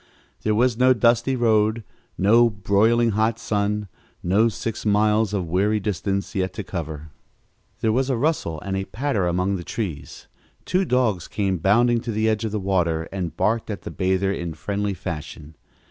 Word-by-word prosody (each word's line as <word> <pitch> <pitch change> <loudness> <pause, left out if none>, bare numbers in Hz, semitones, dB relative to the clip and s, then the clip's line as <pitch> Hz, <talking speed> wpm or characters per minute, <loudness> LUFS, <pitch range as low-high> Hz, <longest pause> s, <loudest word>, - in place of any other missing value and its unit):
There 110 0 +1
was 120 0 +2
no 130 0 +5
dusty 120 +2 +2
road, 110 -2 +2 0.3
no 115 +5 +5
broiling 110 +3 +2
hot 110 +2 +1
sun, 105 -2 -1 0.4
no 105 +6 +3
six 115 0 -5
miles 105 0 +2
of 100 -4 -1
weary 100 +6 +1
distance 100 -1 -2
yet 95 -1 -1
to 105 - -5
cover. 80 -4 -6 0.7
There 110 - +2
was 130 +4 +1
a 130 - +1
rustle 120 - -1
and 95 -1 -3
a 95 0 -2
patter 115 -7 -1
among 90 +3 0
the 85 - -7
trees. 85 -7 -5 0.4
Two 185 +1 +1
dogs 120 - +1
came 95 -4 -1
bounding 115 +7 +3
to 120 - -4
the 110 +1 0
edge 110 0 0
of 110 - -3
the 105 - -2
water 85 -4 0
and 90 -4 -4
barked 115 +1 0
at 100 -5 -5
the - - -6
bather 95 +1 0
in 85 -4 -5
friendly 100 +4 -2
fashion. 80 -3 -7
105 Hz, 175 wpm, -23 LUFS, 95-115 Hz, 0.7 s, no